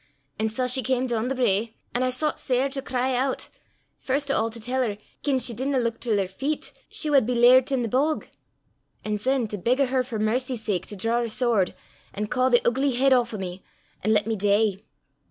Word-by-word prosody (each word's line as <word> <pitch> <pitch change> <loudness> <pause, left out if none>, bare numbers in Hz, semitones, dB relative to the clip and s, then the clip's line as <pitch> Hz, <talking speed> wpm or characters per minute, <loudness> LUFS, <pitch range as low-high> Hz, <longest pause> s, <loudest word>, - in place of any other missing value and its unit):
An' 220 0 +1
sae 250 +4 -1
she 250 +1 +3
cam 255 +1 0
doon 235 -2 -1
the 270 - -1
brae. 225 -2 +1 0.2
An' 245 - 0
I 255 - +2
soucht 300 +5 -1
sair 260 +2 +1
to 270 0 -4
cry 255 0 -1 0.2
oot - - -3 0.5
first 275 +1 -1
o' 225 - +2
a' - - -4
to 230 +1 -7
tell 250 +4 -1
her 215 -5 -1 0.2
gien 280 -2 +1
she 245 -1 +1
didna 265 +4 -1
luik 230 -2 -1
till 225 -4 0
her 195 -2 0
feet, 275 +11 -3 0.2
she 305 - -2
wad 275 -6 +4
be 250 - 0
lairt 250 +3 +6
i' 265 - +1
the - - -1
bog, 285 +7 0 0.8
an' 210 -1 -1
syne 255 +1 +1
to 210 - -4
beg 245 +8 +1
o' 275 - +4
her 260 0 +1
for 240 -3 -5
mercy's 240 +2 -1
sake 195 -5 -2
to 210 - -5
draw 225 +5 0
her 240 - -1
swoord, 225 -5 +1 0.4
an' 210 +1 -2
caw 255 +4 +1
the 240 -1 +4
oogly 265 +2 +1
heid 270 +1 +4
aff 245 -2 +2
o' - - -4
me, 185 -1 -6 0.4
an' 215 - +2
lat 210 -1 +3
me 225 0 -1
dee. 205 0 +1
245 Hz, 230 wpm, -25 LUFS, 215-260 Hz, 0.8 s, lairt